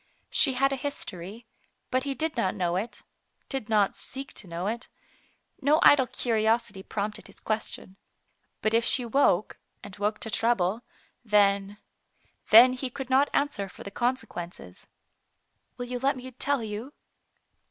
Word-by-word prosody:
She 270 Hz, -, +4 dB
had 275 Hz, +2 st, +2 dB
a -, -, -2 dB
history, 220 Hz, -6 st, -6 dB, 0.5 s
but 255 Hz, +1 st, +1 dB
he 275 Hz, -1 st, -2 dB
did 315 Hz, +3 st, -2 dB
not 195 Hz, -6 st, 0 dB
know 175 Hz, -1 st, 0 dB
it 215 Hz, +6 st, -4 dB, 0.2 s
— -, -, -45 dB
did 265 Hz, -5 st, -4 dB
not 210 Hz, -3 st, +3 dB
seek 270 Hz, 0 st, -5 dB
to 195 Hz, -, -10 dB
know 170 Hz, +1 st, -4 dB
it. 230 Hz, +4 st, -3 dB, 0.7 s
No 295 Hz, +3 st, +4 dB
idle 265 Hz, -3 st, +7 dB
curiosity 225 Hz, -3 st, 0 dB
prompted 210 Hz, +2 st, -4 dB
his -, -, -15 dB
question. 215 Hz, -3 st, -4 dB, 0.7 s
But 215 Hz, -, +1 dB
if 230 Hz, +1 st, +4 dB
she 245 Hz, +1 st, +3 dB
woke, 225 Hz, -5 st, +2 dB, 0.2 s
and 200 Hz, -2 st, -9 dB
woke 210 Hz, +1 st, 0 dB
to 225 Hz, -, -5 dB
trouble, 220 Hz, -2 st, +1 dB, 0.4 s
then 200 Hz, -2 st, +2 dB, 0.4 s
— -, -, -36 dB
then 245 Hz, +4 st, +9 dB
he 255 Hz, 0 st, -4 dB
could 260 Hz, +1 st, -7 dB
not 270 Hz, +2 st, +4 dB
answer 280 Hz, -9 st, -1 dB
for -, -, -12 dB
the 200 Hz, -, -8 dB
consequences. 200 Hz, -, -4 dB, 0.4 s
" -, -, -47 dB
Will 245 Hz, -, -4 dB
you 245 Hz, 0 st, -4 dB
let 275 Hz, +2 st, +1 dB
me 260 Hz, 0 st, -8 dB
tell 275 Hz, 0 st, -1 dB
you 220 Hz, +6 st, -6 dB
230 Hz, 165 wpm, -27 LUFS, 200-260 Hz, 0.7 s, then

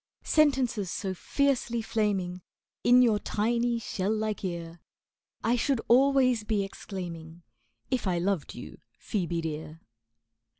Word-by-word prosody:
Sentences 255 Hz, -, +2 dB
so 190 Hz, +2 st, -3 dB
fiercely 250 Hz, +3 st, 0 dB
flaming 200 Hz, -5 st, -1 dB, 0.4 s
In 250 Hz, +1 st, +7 dB
your 220 Hz, -4 st, +3 dB
tiny, 235 Hz, +3 st, 0 dB
shell 200 Hz, -3 st, -3 dB
like 215 Hz, -1 st, -2 dB
ear, 170 Hz, -2 st, -5 dB, 0.6 s
I 235 Hz, +2 st, +3 dB
should 260 Hz, +1 st, +1 dB
always 255 Hz, -2 st, +4 dB
be 210 Hz, -2 st, 0 dB
exclaiming 170 Hz, -4 st, -7 dB, 0.5 s
If 255 Hz, -6 st, 0 dB
I 180 Hz, -2 st, +1 dB
loved 180 Hz, -2 st, -1 dB
you, -, -, -9 dB, 0.2 s
Ph[oe]be 175 Hz, -5 st, -2 dB
dear. 155 Hz, 0 st, -5 dB
210 Hz, 120 wpm, -28 LUFS, 180-240 Hz, 0.6 s, In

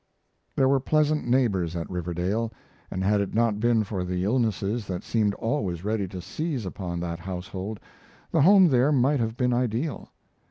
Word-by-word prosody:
There 135 Hz, -, +3 dB
were 135 Hz, 0 st, +3 dB
pleasant 150 Hz, +1 st, +1 dB
neighbors 100 Hz, -10 st, +1 dB
at 85 Hz, -1 st, -3 dB
Riverdale, 90 Hz, +6 st, -2 dB, 0.4 s
and 95 Hz, -, -3 dB
had 100 Hz, +1 st, +3 dB
it 100 Hz, -, -4 dB
not 115 Hz, -2 st, +2 dB
been 115 Hz, -1 st, +3 dB
for 95 Hz, -3 st, -3 dB
the 90 Hz, 0 st, -2 dB
illnesses 110 Hz, -1 st, 0 dB
that 90 Hz, -2 st, -4 dB
seemed 105 Hz, -3 st, +1 dB
always 105 Hz, -, -2 dB
ready 105 Hz, -1 st, -1 dB
to 90 Hz, 0 st, -7 dB
seize 150 Hz, -, -3 dB
upon 90 Hz, -2 st, -4 dB
that 85 Hz, -1 st, -4 dB
household 95 Hz, +3 st, -5 dB, 0.5 s
the 165 Hz, -, +3 dB
home 190 Hz, +2 st, +7 dB
there 130 Hz, +2 st, +3 dB
might 140 Hz, +1 st, +3 dB
have 115 Hz, 0 st, -2 dB
been 125 Hz, -1 st, +1 dB
ideal. 125 Hz, +4 st, -1 dB
110 Hz, 170 wpm, -26 LUFS, 95-125 Hz, 0.5 s, home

